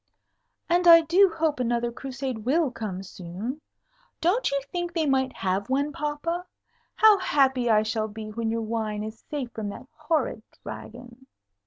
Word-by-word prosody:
"And 350 +1 +2
I 335 -1 +10
do 360 +5 +5
hope 310 -4 +1
another 240 -1 0
Crusade 265 -1 -5
will 275 +6 +1
come 200 -6 -5
soon. 195 - -6 0.6
Don't 380 +9 +2
you 280 - 0
think 350 -1 -3
they 330 -2 +1
might 265 -2 +2
have 195 +4 -1
one, 280 +3 +1
papa? 335 +3 -3 0.5
How 430 -2 +6
happy 265 -8 +2
I 215 -1 +5
shall 220 0 -1
be 215 0 -8
when 225 +1 -2
your 225 0 -1
wine 215 -2 -2
is 220 +1 -8
safe 275 -5 -4
from 215 -2 -4
that 200 - -8
horrid 310 -6 -1 0.2
Dragon!" 245 +2 -10
260 Hz, 160 wpm, -26 LUFS, 220-310 Hz, 0.6 s, I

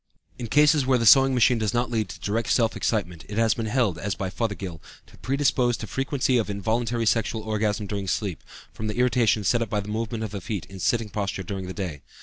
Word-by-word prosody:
In 120 - -4
cases 150 +3 +4
where 130 0 +3
the 115 - -1
sewing 135 +3 +7
machine 125 -1 +4
does 110 +2 -1
not 120 0 0
lead 110 -4 -1
to - - -9
direct 110 +3 -2
self 115 -2 +2
excitement 90 -8 -2
it 105 - -5
has 115 -1 +3
been 115 -1 -3
held, 110 -7 +1
as 100 -1 -2
by 95 -1 -4
Fothergill, 95 -8 -4 0.2
to - - -19
predispose 130 -3 +1
to - - -6
frequency 130 +2 0
of 110 - -2
involuntary 115 +3 -1
sexual 110 0 0
orgasm 105 -1 -1
during 100 -1 -4
sleep, 95 -2 -2 0.3
from 110 - -5
the 105 - -4
irritation 120 -3 +2
set 120 +4 +2
up 115 - -2
by 105 -1 0
the 100 0 -6
movement 110 +1 -3
of 110 - -4
the 100 -2 -5
feet 100 -1 -4
in 95 - -11
the - - -10
sitting 115 +2 0
posture 100 -2 -3
during 95 0 -5
the 95 - -5
day. 85 -8 -5
110 Hz, 235 wpm, -25 LUFS, 100-120 Hz, 0.3 s, sewing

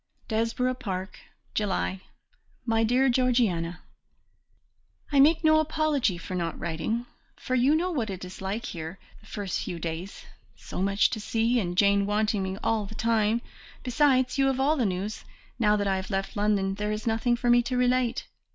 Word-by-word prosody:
"Desborough 230 +3 0
Park, 190 -7 -5 0.3
"July. 195 -2 -1 0.6
"My 225 -1 +2
Dear 250 +4 +3
Georgiana, 235 -10 +1 1.3
"I 280 - +3
make 320 +4 +5
no 310 0 +5
apology 305 - +1
for 185 - -7
not 170 -2 -2
writing, 170 +8 -2 0.3
for 255 - -5
you 255 +4 +4
know 355 +3 0
what 240 -10 -1
it 185 -1 -5
is 180 +1 -10
like 205 +5 -3
here 165 -1 -6 0.2
the 215 - -20
first 200 -3 -3
few 175 - -5
days, 165 +3 -6 0.3
so - - -6
much 195 +4 +2
to 230 - -3
see, 230 +3 +1
and 175 -4 -3
Jane 200 0 +4
wanting 210 0 +1
me 190 0 -3
all 220 -3 0
the 220 - -10
time, 225 0 +1 0.4
besides, 260 0 +2
you 270 - +4
have 265 -1 0
all 285 +4 +3
the 250 -7 +1
news, 195 +3 -4 0.4
now 210 -2 +4
that 205 -1 0
I 190 -1 +1
have 190 0 -5
left 195 -1 -2
London 205 -2 +1
there 210 +1 -2
is 215 0 -4
nothing 230 +1 +1
for 240 0 +1
me 240 0 +6
to 250 +1 -2
relate. 250 -1 +1
220 Hz, 180 wpm, -27 LUFS, 195-250 Hz, 1.3 s, me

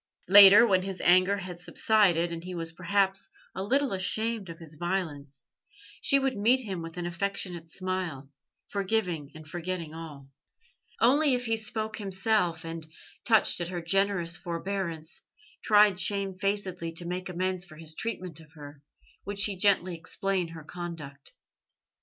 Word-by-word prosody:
Later, 200 +3 +10
when 190 -5 +3
his 190 0 -5
anger 185 +3 +4
had 180 -2 -7
subsided, 175 -1 +2
and 165 0 -6
he 180 0 -6
was 165 -1 -4
perhaps 190 +3 0 0.2
a 190 - -5
little 265 +5 +1
ashamed 215 +2 -2
of 165 - -8
his 160 -2 -11
violence, 155 -5 -4 0.6
she 275 - +4
would 270 -1 0
meet 235 +6 +3
him 195 -7 -5
with 165 +1 -8
an 175 - -3
affectionate 175 -1 -3
smile, 185 -6 -3 0.4
forgiving 185 -7 -1
and 155 0 -11
forgetting 170 -1 -4
all. 155 -4 -9 0.7
Only 275 +3 +5
if 245 0 -3
he 225 -1 +1
spoke 220 0 -3
himself, 190 -4 0
and, 165 -1 -5 0.4
touched 220 -5 +4
at 170 - -2
her 175 0 -4
generous 175 -1 +1
forbearance, 170 -2 -4 0.4
tried 205 -3 +5
shamefacedly 195 -3 -1
to 170 +1 -6
make 180 +2 -4
amends 185 0 -2
for 175 -4 -13
his 160 -1 -4
treatment 180 -5 -4
of 160 -1 -17
her, 145 -2 -12 0.4
would 200 +1 -5
she 200 0 +1
gently 185 -2 +2
explain 185 +2 -2
her 165 -1 -10
conduct. 155 -5 -8
185 Hz, 150 wpm, -28 LUFS, 165-200 Hz, 0.7 s, Later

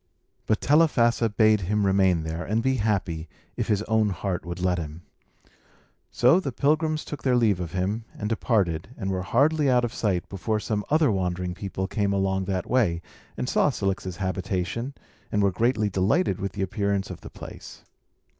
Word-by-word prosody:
But 110 - +1
Telephassa 125 -7 +3
bade 110 0 +3
him 105 +3 0
remain 95 -4 +3
there, 80 +2 -4
and 110 +3 -1
be 130 0 +2
happy, 95 -7 -1 0.3
if - - -2
his 105 -1 +1
own 110 -1 +2
heart 95 -1 -3
would 85 0 -6
let 90 -1 +1
him. 80 +1 -7 1.1
So 130 +9 +4
the 140 -8 -3
pilgrims 155 +4 +1
took 150 - -6
their 130 -2 +2
leave 110 -6 +3
of 85 -1 -5
him, 100 +5 -1
and 105 - -3
departed, 105 -7 0
and 95 -3 -2
were 95 -1 -1
hardly 145 - +2
out 125 -1 +3
of 120 - -5
sight 95 -5 -1
before 105 +3 -2
some 105 -1 -2
other 155 -4 +4
wandering 90 -2 -1
people 95 0 -4
came 100 0 0
along 95 -1 0
that 95 -2 -2
way, 95 -10 +1 0.3
and - - -2
saw - - +3
Cilix's 95 -2 -2
habitation, 95 +6 -2 0.4
and 105 -1 +2
were 100 - +3
greatly 110 +2 +1
delighted 100 - +1
with 100 0 -3
the 100 - -2
appearance 100 0 -1
of - - -9
the - - -9
place. - - -11
100 Hz, 180 wpm, -25 LUFS, 95-115 Hz, 1.1 s, So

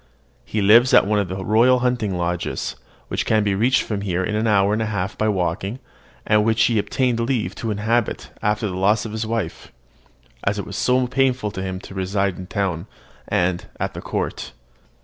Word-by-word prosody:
He 105 -2 -2
lives 115 +6 +6
at - - +6
one 105 +1 +1
of 100 - 0
the 95 +1 -5
royal 120 +4 +5
hunting 120 -7 0
lodges, 85 0 -2 0.3
which - - -1
can 110 -1 +2
be 100 -1 +1
reached 120 +6 +2
from 105 -3 -3
here 95 -2 -1
in 105 - -2
an 110 +1 0
hour 100 -1 +3
and 110 - 0
a 110 - 0
half 100 -2 -2
by 110 - 0
walking, 95 +3 -1 0.5
and 105 0 +4
which 110 0 +3
he 115 -3 +3
obtained 125 +2 0
leave 115 -6 -1
to 115 - -3
inhabit 110 +2 -1
after 105 +1 0
the 95 -3 -3
loss 105 +4 +2
of 110 - -5
his 110 0 -3
wife, 110 -7 -4 0.7
as 100 +1 0
it 100 - -3
is - - -7
so 125 0 +2
painful 125 -3 +1
to 95 - -5
him 95 -1 -4
to - - -11
reside 95 0 -1
in 90 - -7
town 95 -2 -2 0.4
and 90 0 0
at - - -2
the - - -7
court. - - -4
105 Hz, 205 wpm, -22 LUFS, 95-115 Hz, 0.7 s, lives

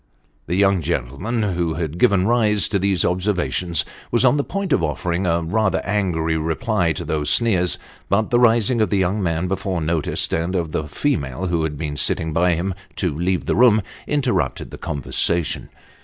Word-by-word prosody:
The 85 - -1
young 100 -1 +3
gentleman, 85 - -2
who 85 -2 -1
had 80 0 -4
given 95 -1 +4
rise 105 -3 +3
to 100 - 0
these 95 -1 +1
observations, 90 -2 0 0.2
was 120 +2 +2
on 130 - +5
the 145 - +1
point 195 -2 -2
of - - +2
offering 85 +3 -1
a 85 0 +1
rather 95 +2 +1
angry 90 -6 0
reply 85 +3 0
to - - -5
these 75 -1 -1
sneers, 95 -7 +3 0.3
but 105 +2 +1
the 120 - +4
rising 115 0 +3
of 110 - +2
the 100 - +1
young 95 +3 0
man 85 0 -1
before 95 -1 -2
noticed, 80 -1 0
and 85 +3 -1
of 85 -4 -1
the 75 - -2
female 75 - -2
who 85 -2 0
had 80 -2 -2
been 75 -1 -4
sitting 80 +1 0
by 90 +2 +3
him, 95 +3 -2 0.2
to 90 -7 -1
leave 90 +3 -1
the - - 0
room, 110 -4 +5 0.2
interrupted 140 -4 -1
the - - -9
conversa 80 +4 0
tion. - - -5
90 Hz, 185 wpm, -21 LUFS, 80-105 Hz, 0.3 s, on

